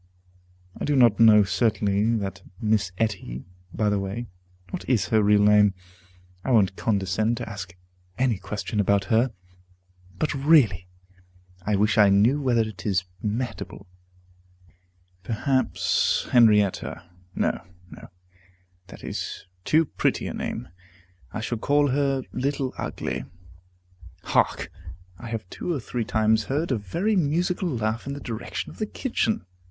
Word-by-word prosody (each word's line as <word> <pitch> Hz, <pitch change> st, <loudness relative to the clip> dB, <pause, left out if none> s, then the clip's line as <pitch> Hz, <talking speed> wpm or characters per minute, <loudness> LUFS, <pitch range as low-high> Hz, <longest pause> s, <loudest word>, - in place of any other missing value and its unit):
I -, -, -4 dB
do 145 Hz, -, +1 dB
not 120 Hz, -5 st, +5 dB
know 110 Hz, -2 st, +7 dB
certainly 105 Hz, +1 st, +1 dB
that 100 Hz, -3 st, -4 dB, 0.2 s
Miss 105 Hz, -4 st, +1 dB
Etty 95 Hz, -, -2 dB, 0.3 s
By 105 Hz, +2 st, 0 dB
the 100 Hz, -, +1 dB
way, 100 Hz, +5 st, -4 dB, 0.5 s
what -, -, -4 dB
is 105 Hz, -8 st, +2 dB
her 110 Hz, -1 st, +4 dB
real 105 Hz, 0 st, +4 dB
name? 105 Hz, -1 st, +5 dB, 0.7 s
I -, -, -3 dB
won't 100 Hz, -6 st, +3 dB
condescend 110 Hz, +2 st, 0 dB
to -, -, -5 dB
ask 95 Hz, -4 st, -7 dB, 0.4 s
any 125 Hz, -6 st, +1 dB
question 105 Hz, +2 st, -4 dB
about 100 Hz, -1 st, +3 dB
her. 120 Hz, +3 st, +3 dB, 0.9 s
But 155 Hz, -, 0 dB
really, 135 Hz, -, +4 dB, 0.8 s
I 105 Hz, -, +2 dB
wish 105 Hz, +1 st, +2 dB
I 105 Hz, -1 st, +7 dB
knew 110 Hz, +9 st, +4 dB
whether 125 Hz, -4 st, +2 dB
it 110 Hz, -3 st, -8 dB
is 95 Hz, -3 st, +1 dB, 0.2 s
Mehitable. 115 Hz, +4 st, -4 dB, 1.4 s
Perhaps 130 Hz, +5 st, 0 dB
Henrietta. 105 Hz, -7 st, +3 dB, 0.3 s
No, -, -, 0 dB, 0.3 s
no, -, -, -11 dB, 0.8 s
that -, -, -12 dB
is -, -, -5 dB, 0.2 s
too 160 Hz, -, +3 dB
pretty -, -, -1 dB
a -, -, -4 dB
name; -, -, -4 dB, 0.6 s
I 105 Hz, -, -4 dB
shall 115 Hz, 0 st, -3 dB
call 145 Hz, +3 st, +2 dB
her 135 Hz, -1 st, +1 dB
Little 135 Hz, 0 st, -2 dB
Ugly. -, -, -4 dB, 1.0 s
Hark! -, -, +1 dB, 0.5 s
I 120 Hz, -, -8 dB
have 110 Hz, -4 st, -4 dB
two -, -, -4 dB
or 155 Hz, -, -1 dB
three 120 Hz, -1 st, -3 dB
times 110 Hz, 0 st, +2 dB
heard 145 Hz, +6 st, -1 dB
a 130 Hz, -, +2 dB
very 175 Hz, -, -1 dB
musical 175 Hz, +2 st, 0 dB
laugh 115 Hz, -2 st, -2 dB
in 140 Hz, -, -3 dB
the 140 Hz, -, -6 dB
direction 115 Hz, -4 st, -5 dB
of -, -, -15 dB
the 215 Hz, -, -1 dB
kitchen. 120 Hz, -, -1 dB
110 Hz, 140 wpm, -25 LUFS, 105-130 Hz, 1.4 s, know